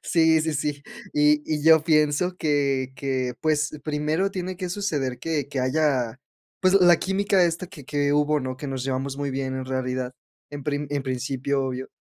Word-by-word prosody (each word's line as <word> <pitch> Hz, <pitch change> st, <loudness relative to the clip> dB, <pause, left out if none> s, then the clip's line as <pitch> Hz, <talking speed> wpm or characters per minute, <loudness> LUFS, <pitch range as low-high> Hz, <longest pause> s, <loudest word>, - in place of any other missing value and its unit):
Sí, 160 Hz, -2 st, +3 dB
sí, 160 Hz, 0 st, -1 dB
sí, 145 Hz, 0 st, -2 dB, 0.3 s
y 150 Hz, 0 st, +4 dB
y 150 Hz, -1 st, -1 dB
yo 160 Hz, -1 st, +7 dB
pienso 155 Hz, +3 st, +2 dB
que 140 Hz, -5 st, 0 dB
que, 130 Hz, -1 st, -2 dB
pues, 150 Hz, 0 st, +1 dB
primero 155 Hz, +5 st, 0 dB
tiene 185 Hz, -1 st, -4 dB
que 185 Hz, -2 st, -3 dB
suceder 155 Hz, -10 st, -2 dB
que 150 Hz, -4 st, -2 dB
que 140 Hz, -1 st, -4 dB
haya, 130 Hz, -3 st, 0 dB, 0.4 s
pues, 185 Hz, 0 st, +3 dB
la 175 Hz, -3 st, +7 dB
química 195 Hz, 0 st, +2 dB
esta 170 Hz, +1 st, 0 dB
que 145 Hz, -5 st, -12 dB
que 145 Hz, -1 st, 0 dB
hubo, 150 Hz, +1 st, +2 dB
¿no?, 130 Hz, -1 st, -4 dB
que 145 Hz, -, -6 dB
nos 135 Hz, -2 st, -4 dB
llevamos 135 Hz, +1 st, -2 dB
muy 145 Hz, 0 st, -2 dB
bien, 130 Hz, 0 st, -3 dB
en 130 Hz, -, -4 dB
realidad, 130 Hz, -1 st, -2 dB, 0.4 s
en 145 Hz, -1 st, -7 dB
prim 145 Hz, 0 st, -2 dB
en 145 Hz, -1 st, -1 dB
principio, 135 Hz, +1 st, -1 dB
obvio, 130 Hz, 0 st, -4 dB
145 Hz, 185 wpm, -24 LUFS, 130-160 Hz, 0.4 s, yo